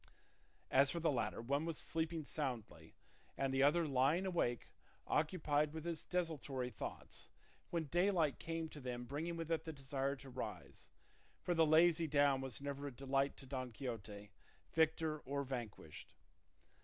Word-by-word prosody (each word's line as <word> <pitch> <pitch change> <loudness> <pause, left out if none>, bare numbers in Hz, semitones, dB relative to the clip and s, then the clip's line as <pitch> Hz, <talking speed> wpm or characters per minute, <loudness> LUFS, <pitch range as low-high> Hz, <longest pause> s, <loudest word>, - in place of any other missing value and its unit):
As 135 +1 +6
for 170 - -1
the 165 -2 +3
latter, 120 -3 -1
one 140 +5 +1
was 165 -2 -2
sleeping 160 -1 -1
soundly 130 -8 -4 0.4
and 135 -1 0
the 135 - +3
other 155 +4 +5
lying 140 +7 +3
awake 165 -10 0 0.4
occupied 150 -2 +1
with 160 0 -5
his 170 -3 -2
desultory 145 -8 -2
thoughts, - - -7 0.4
when 170 -1 0
daylight 175 -2 +2
came 165 0 -3
to 150 - -9
them 125 -2 -4
bringing 155 +6 -3
with 165 0 -4
it 160 -1 +1
the 160 - -4
desire 135 -1 -2
to 135 -1 -12
rise; 125 - -6 0.5
for 175 - +1
the 165 -2 +5
lazy 165 +1 +5
down 145 -2 +4
was 135 0 -4
never 140 0 -3
a - - -4
delight 135 +2 0
to 135 - -9
Don 130 -2 -4
Quixote, 105 -5 -6 0.4
victor 160 -1 +2
or 140 0 -2
vanquished. 120 - -6
145 Hz, 155 wpm, -39 LUFS, 135-160 Hz, 0.5 s, As